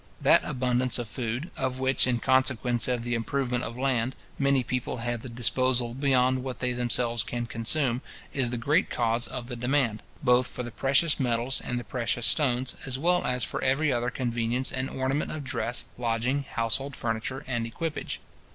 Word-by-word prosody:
That - - +5
abundance 125 0 +1
of 120 -2 -4
food, 120 - -4
of 130 -3 -2
which, 130 0 +3
in 125 -1 +2
consequence 125 -2 +2
of 125 -2 -1
the 120 0 -2
improvement 125 +1 -1
of 115 - -5
land, 130 -1 0 0.2
many 140 -2 +3
people 125 +1 -3
have 120 0 -2
the 130 - -6
disposal 125 0 +2
beyond 130 -1 +2
what 130 -2 -4
they 125 -1 -1
themselves 120 -1 0
can 120 +1 -3
consume, 120 +2 0 0.3
is 130 -3 +2
the 120 - -2
great 145 +9 +2
cause 115 0 +1
of 125 -2 -5
the 120 0 -5
demand, 125 -2 0 0.2
both 125 -1 +4
for 125 - -5
the 120 - -6
precious 140 +7 +3
metals 125 0 0
and 120 - -2
the - - -6
precious 120 +1 -1
stones, 130 -1 +2
as 130 -1 0
well 175 +5 +2
as 125 -1 +1
for - - -2
every 135 +2 +2
other 120 0 0
conveniency 120 0 -1
and 130 +1 -2
ornament 135 +3 -1
of 155 -2 -5
dress, 120 -2 -1
lodging, 125 +4 0
household 115 +4 0
furniture, 115 +3 -3
and 120 -3 -1
equipage. 155 +7 -4
125 Hz, 180 wpm, -27 LUFS, 120-130 Hz, 0.3 s, That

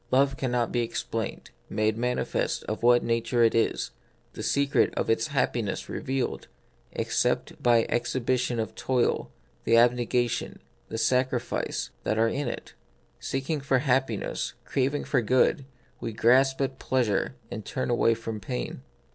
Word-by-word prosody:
Love 135 +1 +3
cannot 125 -3 0
be 120 - 0
explained, 115 -1 -4 0.2
made 110 0 +1
manifest 125 +2 -1
of 110 - -4
what 120 +1 +5
nature 115 +1 +1
it 115 - +4
is, 115 - +1 0.4
the - - -7
secret 140 0 +2
of - - +1
its 115 0 +1
happiness 125 -7 -1
revealed, 130 -2 -2 0.4
except - - -1
by 120 -2 +5
an - - -8
exhibition 120 0 0
of 110 - -1
the - - -24
toil, 125 -2 0 0.3
the 115 - +4
abnegation, 120 0 +2 0.3
the 110 - -4
sacrifice, 125 +2 0
that 110 - 0
are 115 +1 +4
in 140 +2 -2
it. - - -6 0.5
Seeking 140 +3 -2
for 135 -1 +2
hap 130 0 +2
piness, 110 - -3
craving 140 +2 0
for 125 - +1
good, 130 +5 +2 0.3
we 115 - -4
grasp 130 +4 +4
at 135 -1 -2
pleasure 125 -2 0 0.2
and 110 - -5
turn 130 - -2
away 115 -1 +3
from 115 -1 -5
pain. 60 -9 -4
120 Hz, 150 wpm, -27 LUFS, 115-130 Hz, 0.5 s, what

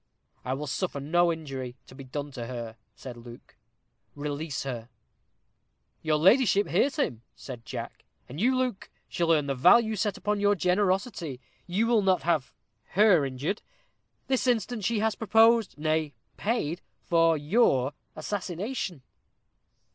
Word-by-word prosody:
"I 130 +1 -2
will 150 +2 -5
suffer 145 +2 -3
no 170 +5 +2
injury 135 -6 -6
to - - -15
be 135 - -10
done 140 +2 -5
to 120 -3 -6
her," 120 -3 -6 0.2
said 125 -2 -9
Luke; 120 0 -13 0.6
"release 145 +1 -4
her." 120 -4 -5 1.1
"Your 155 -1 +1
ladyship 200 - +4
hears 205 - +1
him," 125 - -1
said 125 -4 -10
Jack. - - -7 0.2
"And 145 +8 -7
you, 255 +3 +3
Luke, 255 -6 -2 0.2
shall 170 - -1
learn 155 -3 +3
the 140 - -1
value 220 - +5
set 210 -1 -1
upon 210 0 -1
your 205 0 +3
generosity. 185 - 0 0.3
You 190 +6 +1
will 230 -2 +3
not 190 -2 +2
have 160 -6 0 0.5
her 200 -7 +6
injured. 140 - -3 0.6
This 260 -1 0
instant 235 -2 0
she 235 - +1
has 220 0 +1
proposed, 225 0 +3
nay, 155 -2 -1 0.2
paid 185 -7 -2 0.2
for 165 -1 +3
your 145 - +2 0.2
assassination." 180 - -4
170 Hz, 140 wpm, -27 LUFS, 140-210 Hz, 1.1 s, her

